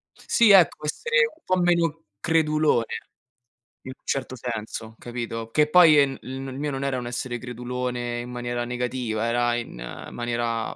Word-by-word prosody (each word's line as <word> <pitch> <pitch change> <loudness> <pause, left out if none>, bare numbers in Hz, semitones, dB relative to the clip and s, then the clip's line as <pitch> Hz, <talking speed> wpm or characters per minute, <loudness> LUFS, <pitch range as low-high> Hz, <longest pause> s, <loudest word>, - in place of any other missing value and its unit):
Sì, 230 -4 +4
ecco! 175 -5 +5
Essere 475 - +1
un 325 -5 -17
po' 185 0 +1
meno 170 -2 +1 0.2
credulone, 155 -4 +2 1.0
in 130 - -7
un - - -49
certo 130 -1 -2
senso, 115 -1 -6
capito? 115 -2 -5
Che 150 0 +3
poi 165 -3 +7
en 135 -2 +3
il 130 +1 -6
n 135 - -6
il 130 - -7
mio 145 0 -2
non 135 0 -3
era 135 -2 -1
un 120 - -4
essere 120 0 -3
credulone 125 0 -4
in 125 +1 -8
maniera 120 0 -3
negativa, 125 -2 -2
era 120 0 +1
in 120 - -5 0.4
maniera 120 -1 -2
125 Hz, 165 wpm, -25 LUFS, 120-150 Hz, 1.0 s, poi